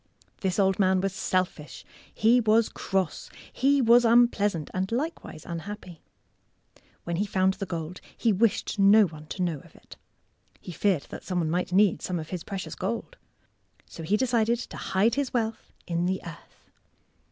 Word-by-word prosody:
This 190 -2 -1
old 195 -1 +2
man 190 -1 +3
was 195 0 -1
selfish. 185 -5 -2 0.3
He 230 +3 +4
was 220 0 +3
cross. 190 -5 -2 0.2
He 275 +1 +3
was 240 +1 +6
unpleasant, 220 -8 +3
and 190 +2 -2
likewise 255 - -4
unhappy. 175 0 -7 1.0
When 170 -1 -3
he 205 - 0
found 190 -1 +2
the 195 - -6
gold, 170 +1 -5 0.2
he 225 -3 +2
wished 210 0 0
no 205 +2 +7
one 155 -3 -10
to 185 - -3
know 165 -5 -1
of - - -19
it. - - -15 0.6
He - - -9
feared 175 -2 +1
that - - -8
some 185 - -3
one 160 -3 0
might 180 +1 -1
need 195 0 +3
some 180 - -3
of 155 - -7
his 180 -3 -5
precious 195 -2 -6
gold. - - -4 0.7
So - - -11
he 195 +7 +1
decided 235 -1 +1
to 245 - -8
hide 200 +5 +1
his 280 -2 -2
wealth 225 -2 -2
in 170 0 -1
the 190 +1 -1
earth. 165 0 -13
190 Hz, 170 wpm, -27 LUFS, 175-220 Hz, 1.0 s, no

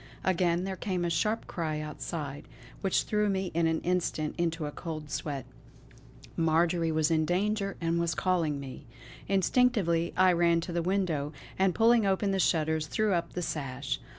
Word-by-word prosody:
Again 175 -1 +2
there 190 0 -3
came 185 -2 -2
a 170 - 0
sharp 215 +8 0
cry 155 -4 -3
outside, 150 -1 -5 0.3
which 195 - +1
threw 210 -1 +1
me 190 -1 -1
in 165 0 +2
an 160 0 +1
instant 170 -3 -1
into 165 -2 -1
a 145 - -4
cold 155 -2 -6
sweat. 140 -2 -3 0.9
Marjory 165 +1 +2
was 155 +1 +1
in 160 -1 +3
danger 195 +4 0
and 165 0 0
was 170 -1 0
calling 165 -6 0
me! 135 0 -9 0.4
Instinctively 195 -4 +2
I 185 0 +6
ran 170 -1 +3
to 170 +1 -5
the 170 - 0
window, 165 -5 -1 0.3
and 190 -2 +3
pulling 230 -2 +4
open 195 +1 +1
the 195 - 0
shutters, 160 -3 +1
threw 215 +4 +1
up 170 -1 -1
the 180 - -3
sash. 135 -4 -3
170 Hz, 170 wpm, -29 LUFS, 155-190 Hz, 0.9 s, I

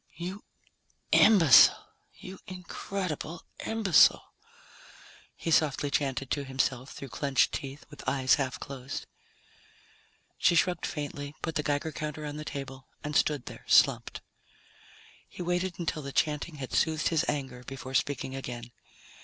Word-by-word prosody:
"You 180 +6 -6 0.7
imbecile, 165 - +7 0.3
you 190 +1 -10
incredible 180 -2 -5 0.2
imbecile," 220 -6 +4 1.0
he 165 - -4
softly 145 -2 +2
chanted 135 -2 -1
to 145 - 0
himself 130 -1 -1
through 135 - -9
clenched 140 0 +1
teeth, 140 +1 -6
with 145 - -4
eyes 130 -1 +3
half 130 -2 -3
closed. 135 0 -6 1.3
She 175 - +4
shrugged 175 +1 +2
faintly, 145 -1 -5
put 165 - -2
the 150 - 0
Geiger 145 +2 -1
counter 150 +1 -5
on 150 0 -5
the 155 - -5
table, 135 -3 -7 0.2
and 150 0 -4
stood 145 -4 +2
there - - -10
slumped. - - +3 1.1
He 180 - -7
waited 180 +1 -1
until 165 -3 -2
the 140 -1 -6
chanting 150 +2 0
had 135 -3 -7
soothed 155 -2 +2
his 165 -1 +1
anger, 135 -4 -3
before 135 -1 -7
speaking 135 0 -1
again. 120 -2 -6
145 Hz, 135 wpm, -29 LUFS, 135-165 Hz, 1.3 s, imbecile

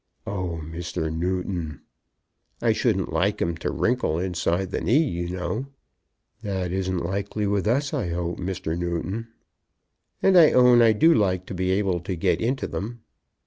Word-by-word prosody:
"Oh, 90 -4 -3
Mr. 80 0 -4
Newton!" 90 -3 -2 0.8
"I - - +2
shouldn't - - 0
like - - +1
'em 85 0 0
to 85 - -3
wrinkle 120 -10 0
inside 90 +1 -1
the - - -2
knee, 145 +8 +3
you 85 -5 -3
know." 90 +8 -3 0.7
"That 95 -5 -2
isn't 95 -2 -1
likely 100 +3 -2
with 100 0 0
us, 140 +5 +1
I 85 - -1
hope, 85 0 -3
Mr. 90 -3 -3
Newton." 85 +6 -3 1.0
"And 190 -2 +6
I 160 - +7
own 125 -1 +6
I 115 -1 +6
do 160 +10 +5
like 95 -4 +1
to - - -7
be 90 0 -1
able 95 -2 +1
to 90 +2 -4
get 80 - +1
into 130 +4 0
them." 115 +4 -5
95 Hz, 160 wpm, -25 LUFS, 85-110 Hz, 1.0 s, I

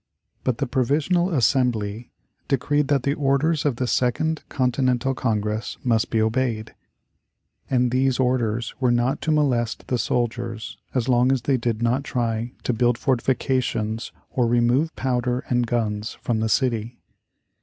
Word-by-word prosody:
But 125 -3 0
the 140 - 0
Provisional 145 +8 +1
Assembly 120 - +1 0.4
decreed 145 +1 +1
that 140 -3 +1
the 140 - +1
orders 145 +2 +1
of 140 -4 +2
the 125 - -1
Second 155 +6 0
Continental 130 0 +1
Congress 110 -3 -2
must 115 -3 +1
be 110 - +1
obeyed. 110 0 0 1.0
And 125 -2 +2
these 130 0 +1
orders 120 -3 0
were 130 -2 +2
not 120 +4 +1
to 160 - 0
molest 125 -7 +1
the 125 - +1
soldiers 115 -1 -2 0.2
as 125 -1 0
long 125 0 +4
as 130 -4 0
they 140 - +2
did 115 -2 -2
not 125 +4 +1
try 120 -2 -2
to 125 - 0
build 120 +1 +2
fortifications 120 -4 0 0.2
or 125 -2 +1
remove 120 +7 +2
powder 125 -1 -1
and 120 -1 +1
guns 110 -2 -2
from 115 -2 -1
the 110 0 0
city. 120 -1 0
125 Hz, 145 wpm, -23 LUFS, 115-135 Hz, 1.0 s, long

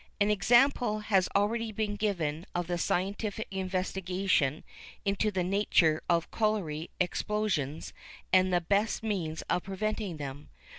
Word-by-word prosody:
An 205 +1 +3
example 240 +3 +4
has 195 -3 +2
already 220 +3 +1
been 210 -1 -2
given 170 -6 -2
of 175 0 0
the 175 0 -2
scientific 200 +5 -1
investigation 185 -5 0 0.4
into 200 +2 +1
the 185 -3 -1
nature 180 -4 +3
of 170 -1 +1
colliery 190 -8 -1
explosions 180 -5 -1 0.4
and 185 0 +5
the 175 -1 +3
best 205 +6 +1
means 175 -8 -2
of 180 - 0
preventing 200 -1 -3
them. 145 0 -7
190 Hz, 130 wpm, -30 LUFS, 170-210 Hz, 0.4 s, and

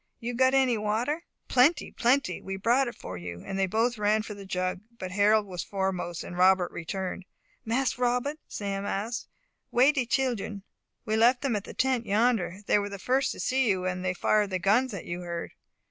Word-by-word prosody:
You 240 +1 -4
got 260 +2 +3
any 255 -4 +3
water?" 235 +10 -1 0.2
"Plenty 295 +6 +3
plenty. 245 -5 +1
We 195 - -5
brought 245 +7 +2
it 240 - -5
for 90 -1 -7
you," 85 0 -7
and 195 0 -4
they 190 - +2
both 225 +4 0
ran 210 +1 +2
for 215 - -7
the 200 -1 -10
jug, 185 -1 -1 0.2
but 185 -3 -6
Harold 210 +2 +4
was 180 -3 -5
foremost, 190 -3 -2
and 175 - -8
Robert 185 0 +4
returned. 185 +2 -4 0.4
"Mas 250 +3 0
Robbut," 250 +5 0
Sam 200 -1 -4
asked, 220 +6 -3 0.4
"wey 260 +4 +5
de 265 -5 -1
children?" 235 -6 -1 0.4
"We 220 0 0
left 245 +3 +4
them 265 -5 +1
at 205 - -3
the - - -10
tent 255 -3 +1
yonder. 205 -3 +1
They 210 - +3
were 205 0 -3
the 200 - -6
first 260 +7 +1
to - - -11
see 260 -2 +1
you; 185 -2 0
and 185 0 -2
they 185 0 -1
fired 210 +1 +2
the 185 - -1
guns 215 +8 +2
that 195 -4 -6
you 175 +1 -4
heard." 170 -1 -5
210 Hz, 205 wpm, -28 LUFS, 190-245 Hz, 0.4 s, wey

